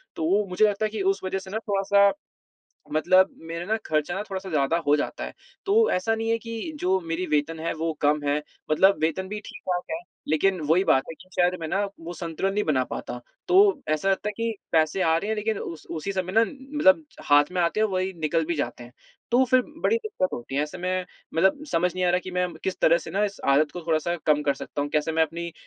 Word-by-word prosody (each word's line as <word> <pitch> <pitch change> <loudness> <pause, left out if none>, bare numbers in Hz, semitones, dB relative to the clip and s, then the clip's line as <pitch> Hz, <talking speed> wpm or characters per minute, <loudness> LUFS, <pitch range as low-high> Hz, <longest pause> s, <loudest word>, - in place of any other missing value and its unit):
तो 160 - -3
वो 200 +3 +3
मुझे 180 +3 +3
लगता 210 +1 0
है - - 0
कि 215 -2 -3
उस 195 - +2
वजह 190 +1 -2
से 190 - -11
ना, 220 - -1
थोड़ा-सा 200 -1 +3 0.8
मतलब 185 +4 +4 0.2
मेरा 165 +1 -4
ना 220 +1 +1
खर्चा 155 +3 0
ना, 195 - -2
थोड़ा-सा 190 -2 -6
ज़्यादा 150 +1 +2
हो 145 - +5
जाता - - -3
है। - - -6 0.3
तो 445 +3 +4
ऐसा 205 +5 +1
नहीं 225 0 -2
है 230 - +2
कि 230 +7 -6
जो 190 +1 +2
मेरी 165 +1 -3
वेतन 155 +1 0
है, 165 - -1
वो 160 +1 -2
कम 150 +1 +3
है, 145 +1 +2 0.3
मतलब 190 +6 +5
वेतन 185 +4 0
भी 210 +1 -4
ठीक-ठाक 180 -1 -3
है, 320 - -2 0.3
लेकिन 180 +4 +2
वही 185 +4 +4
बात 135 - +3
है - - -6
कि 185 - -15
शायद 180 0 +3
मैं 160 - -4
ना, 195 +4 +1 0.2
वो 170 +1 -7
संतुलन 170 +3 -2
नहीं 210 - +1
बना 130 -5 +2
पाता, 120 - -5 0.3
तो 385 -5 +5
ऐसा 155 +6 +1
लगता 195 +2 0
है 210 - -2
कि 230 -1 -1 0.2
पैसे 160 +3 +2
आ 160 0 +3
रहे 200 - -2
हैं, 220 - 0
लेकिन 215 0 -1
उस 160 -2 -7
उसी 170 +5 -3
समय 185 -1 -2
ना, 225 +2 +5
मतलब 285 +4 +2 0.3
हाथ 145 +4 +5
में 180 - 0
आते 170 +5 +1
हैं - - +4
और - - -7
वही 185 +1 0
निकल 160 +1 +1
भी 170 - -1
जाते 120 -4 -3
हैं, 120 - -14 0.4
तो 250 +2 +5
फिर 255 0 +4 0.2
बड़ी 455 - +3
दिक्कत 430 - -2
होती 120 +3 -6
है। 145 - +2
ऐसे 150 +4 -6
में 185 +1 -1 0.3
मतलब 190 - +2
समझ 175 +1 +1
नहीं 185 0 -1
आ 175 - +3
रहा 180 - +3
कि - - -4
मैं 180 -1 -1
किस 190 - -2
तरह 170 +1 +5
से - - -9
ना, 200 +4 +1
इस 200 -1 -4
आदत 145 +2 +3
को 180 - -6
थोड़ा-सा 165 +2 +1
कम 150 -1 +3
कर 140 -1 +1
सकता 145 +1 -4
हूँ? 145 - -3
कैसे 155 +1 0
मैं 160 - +3
अपनी 170 +2 -3
180 Hz, 250 wpm, -25 LUFS, 160-205 Hz, 0.8 s, हो